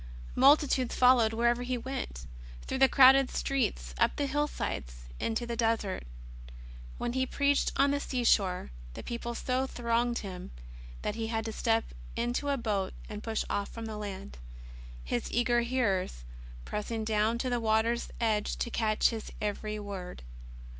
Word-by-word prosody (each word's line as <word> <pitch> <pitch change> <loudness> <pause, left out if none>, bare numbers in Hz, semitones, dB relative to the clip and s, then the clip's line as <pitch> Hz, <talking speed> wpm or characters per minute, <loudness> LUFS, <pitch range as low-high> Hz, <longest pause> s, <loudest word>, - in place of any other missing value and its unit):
Multitudes 270 -2 +4
followed 250 -3 +5
wherever 235 +2 +2
He 250 0 -1
went, 245 - -5 0.4
through 265 - -3
the 265 0 +6
crowded 270 0 +7
streets, - - -1
up - - +3
the 285 - 0
hillsides, 165 - -3 0.2
into 230 +1 -1
the 235 0 -3
desert. 225 - 0 0.9
When 240 - -2
He 260 0 0
preached 280 +1 +2
on 280 0 +4
the 285 - +1
seashore, 205 - +1 0.2
the - - -7
people 235 0 -4
so 255 +2 0
thronged 240 -1 0
Him 185 -3 -6 0.5
that - - -1
He 225 0 -3
had 225 0 -2
to 225 - -3
step 225 +1 0 0.2
into 240 +4 -1
a 280 - +1
boat 205 -5 -1
and 210 -1 -6
push 225 -1 -2
off 200 - -2
from 230 -1 -7
the 220 -1 -5
land. 190 - -7 0.6
His 90 - -2
eager 240 0 +2
hearers 205 - 0 0.4
pressing 220 +1 -3
down 215 +1 +1
to 255 +1 -2
the 245 - +1
water's 225 +1 +1
edge 215 -3 +1
to 235 - -2
catch 215 -2 +2
His 225 -2 -6
every 210 0 -3
word. 195 - -7
230 Hz, 155 wpm, -30 LUFS, 210-250 Hz, 0.9 s, crowded